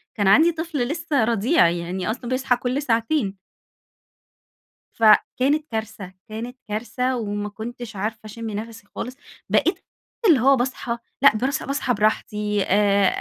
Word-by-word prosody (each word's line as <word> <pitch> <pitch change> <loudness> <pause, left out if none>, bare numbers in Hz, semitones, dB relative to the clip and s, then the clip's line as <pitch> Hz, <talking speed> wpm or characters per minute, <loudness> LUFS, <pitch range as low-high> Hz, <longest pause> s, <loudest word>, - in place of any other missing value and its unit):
كان 205 -3 +1
عندي 315 - +6
طفل 320 -6 -3
لسه 310 -3 0
رضيع، 230 - +3
يعني 175 +3 -3
أصلًا 240 +1 -6
بيصحى 255 0 +1
كل 250 +3 -2
ساعتين. 230 -4 0 1.6
فكانت 255 +7 +3
كارثة، 220 -4 -5 0.2
كانت 235 +4 -6
كارثة 240 +4 -2
وما 205 -3 -3
كُنتش 230 +2 -8
عارفة 215 +3 -3
أشم 225 +1 -6
نفَسي 220 +1 -7
خالص. 255 +2 -5 0.3
بقيت - - +2 0.5
اللي 315 -8 +6
هو 270 +4 +5
باصحى 245 -2 -2 0.2
لأ، 275 -5 +7
برَص 265 +5 -1
باصحى 275 -2 -1
براحتي، 210 -1 0
آآ 200 0 +3
230 Hz, 130 wpm, -23 LUFS, 210-260 Hz, 1.6 s, لأ